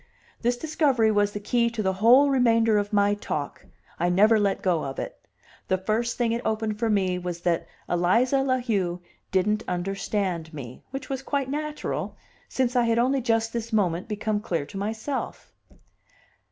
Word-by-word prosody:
This 240 +1 +1
discovery 275 -6 +2
was 205 -1 +2
the 205 - -5
key 235 +3 +1
to 230 -2 -3
the 190 -1 +1
whole 245 +8 +5
remainder 230 -4 +4
of 205 +1 -3
my 205 -1 +3
talk; 150 -8 -4 0.4
I 175 +1 +2
never 210 +5 +5
let 200 -1 0
go 175 -4 +1
of 135 -1 -5
it. - - -5 0.5
The 185 - +2
first 220 +5 -1
thing 240 -2 +1
it 235 +1 -1
opened 220 -1 -1
for 230 0 +1
me 190 -3 +1
was 175 -1 -5
that 170 -1 0 0.2
Eliza 230 +10 +2
La 260 -1 +1
Heu 195 -8 -1 0.3
didn't 210 +3 +1
understand 180 -2 -2
me, 130 -4 -8
which 270 +1 -6
was 270 -1 -3
quite 270 -1 -2
natural, 300 +1 -3 0.3
since 255 -1 0
I 245 -1 +4
had 230 0 +2
only 260 +3 +2
just 225 -1 0
this 230 0 -4
moment 185 -4 +1
become 215 0 -1
clear 170 -8 -2
to 155 - -13
myself. 220 +7 -4
215 Hz, 175 wpm, -25 LUFS, 190-240 Hz, 0.5 s, whole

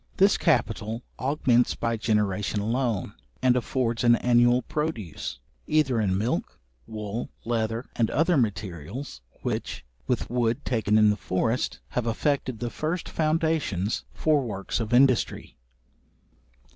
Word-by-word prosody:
This - - +5
capital 115 +3 0 0.2
augments 130 -3 +2
by 115 0 -1
generation 105 -2 0
alone, 115 -1 -1 0.3
and 125 -1 +5
affords 120 -1 -1
an 120 0 +6
annual 120 +1 +4
produce, 115 - -4 0.3
either 135 -7 +2
in 95 -3 +1
milk, 105 -4 -2 0.3
wool, 110 +1 -5 0.2
leather, 115 0 -1
and 115 -2 +2
other 165 +4 +2
materials, 105 - -3 0.2
which, - - -3 0.2
with 125 - 0
wood 120 +2 0
taken 110 -3 +2
in 105 -1 +6
the 105 - -2
forest, 115 +7 -1
have 125 -1 -2
effected 130 +1 0
the 120 +1 -4
first 165 +3 -3
foundations 155 - 0
for 155 -2 +2
works 100 -5 -3
of 115 -1 -3
industry. 130 -1 +3
120 Hz, 125 wpm, -26 LUFS, 105-130 Hz, 0.3 s, an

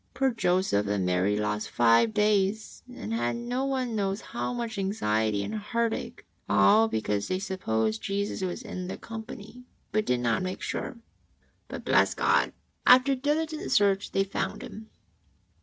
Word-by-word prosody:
Poor 270 -1 +2
Joseph 180 - +1
and 100 -2 0
Mary 90 +3 +1
lost 105 0 -2
five 120 - +4
days 210 0 +1
and 110 - -6
had 120 +1 0
no 245 +3 -2
one 260 -4 -1
knows 195 -1 -1
how 240 - -4
much 235 -3 -4
anxiety 110 - 0
and - - -5
heartache, 225 +2 -2 0.2
all 220 +2 +5
because 105 - -1
they 185 - 0
supposed 110 - -1
Jesus 200 0 -2
was 185 +6 -3
in 185 -5 -6
the 185 - -5
company, 225 +1 -9 0.3
but 215 0 0
did 125 -1 +2
not 115 -2 +1
make 185 0 -4
sure. 255 - -4 0.7
But, - - -8
bless - - +3
God, - - +2 0.3
after 255 +2 +6
diligent 305 +4 -1
search 200 -1 +3
they 195 - +2
found 195 - -3
Him 220 +1 -10
200 Hz, 155 wpm, -27 LUFS, -, 0.7 s, after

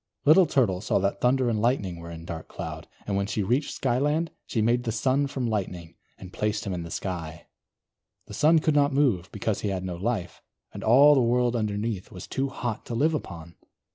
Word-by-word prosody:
Little 165 +4 +7
Turtle 95 -9 +1
saw - - +1
that 100 0 -1
Thunder 130 +1 +3
and 110 -3 0
Lightning 105 -7 0
were 85 0 -9
in 85 0 -9
Dark 80 -1 -7
Cloud; - - -7 0.2
and 100 - -2
when 100 0 0
she 105 0 -1
reached 125 +9 0
Skyland, 145 +6 0 0.2
she 115 - -2
made 120 +3 +2
the 115 - -2
Sun 130 +5 +1
from 135 -2 -3
Lightning, 90 -6 -3 0.2
and 95 -1 -11
placed 105 0 -1
him 100 - -2
in 90 - -3
the 85 - -7
Sky. 85 -3 -5 0.8
The - - -11
Sun 160 +2 +4
could 155 - +2
not 145 0 +3
move, 120 -11 +1
because 105 0 -2
he 105 - -1
had 95 -1 -3
no 90 -2 -4
life, 95 -1 -3 0.3
and - - -7
all 135 +6 +7
the 135 - +4
world 120 0 +2
underneath 105 -2 -2
was 90 - -8
too 135 +1 -2
hot 120 -4 -4
to 120 - -4
live 155 +7 +2
upon. 85 - -6
110 Hz, 210 wpm, -26 LUFS, 95-130 Hz, 0.8 s, Little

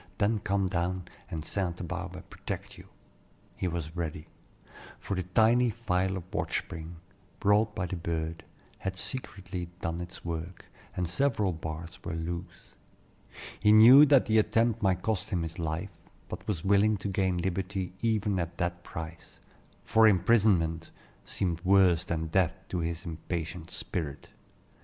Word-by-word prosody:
Then 105 +2 +2
come 100 -1 0
down, 90 0 -1 0.2
and 80 -4 -5
St. 90 -3 -2
Barbe - - -6
protect - - -6
you," - - -14 0.7
he 95 - -2
was 85 -2 -4
ready; 80 -3 -4 0.7
for - - -4
the 90 - 0
tiny 110 +7 +4
file 95 -4 0
of 90 - -6
watch - - 0
spring, 80 +1 -8 0.4
brought 105 +1 +3
by 95 -4 -1
the 90 +1 -4
bird, 80 -1 -3 0.4
had 95 0 -3
secretly 95 -6 -5
done 85 +1 -3
its 90 +1 -8
work, 85 +1 -5 0.3
and 90 -1 0
several 105 0 +1
bars 80 +1 -7
were - - -4
loose. 85 +1 -6 0.9
He 105 +1 +5
knew 125 +7 +9
that 140 -2 +6
the 110 0 +4
attempt 115 +1 +2
might 95 -3 +1
cost 110 -2 -1
him 90 -6 0
his 80 +1 -6
life, 80 +4 -3 0.3
but - - -7
was 95 -6 -2
willing 100 +2 +4
to 100 - -4
gain 95 -2 +1
liberty 95 +1 -2
even 105 -4 +1
at 85 0 -4
that 85 0 -2
price; 80 0 -8 0.4
for 110 0 +5
imprisonment 95 -6 +3 0.4
seemed 85 -3 -2
worse 95 -3 +5
than 80 -2 -2
death 90 +2 +2
to 90 - -2
his 85 0 -3
impatient 85 0 -5
spirit. 75 -5 -4
90 Hz, 150 wpm, -29 LUFS, 85-100 Hz, 0.9 s, knew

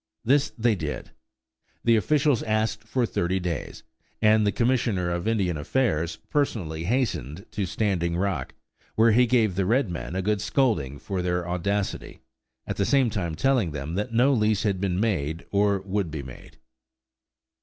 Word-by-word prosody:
This 140 +4 +3
they 115 0 +3
did. 75 -7 -5 0.7
The 115 -1 +4
officials 145 +3 +2
asked 110 0 -1
for 125 +2 0
thirty 95 -3 -1
days; 85 -5 -4 0.4
and 110 -1 +4
the - - +3
Commissioner 115 -8 +1
of 85 +3 -2
Indian 95 -7 +1
Affairs 80 - 0 0.2
personally 85 - -1
hastened 100 - -1
to 105 -3 -2
Standing 85 -5 0
Rock, 90 -8 -2 0.4
where 115 +1 +5
he 125 +3 +4
gave 115 -5 +3
the 95 0 0
red 115 -3 +2
men 85 +1 -5
a 95 - -1
good 105 0 0
scolding 105 - 0
for 95 +4 -3
their 90 -1 -1
audacity, 90 -6 -2 0.4
at - - -4
the 100 - +2
same 135 -2 +3
time 85 -7 -2
telling 125 - +1
them 75 +2 -5
that 105 +6 -2
no 125 +5 +4
lease 110 -3 +2
had 100 -3 0
been 95 -2 0
made, 85 -7 -1
or 100 -1 +2
would 100 -2 -2
be 75 -2 -5
made. 65 -1 -12
100 Hz, 165 wpm, -25 LUFS, 85-115 Hz, 0.7 s, where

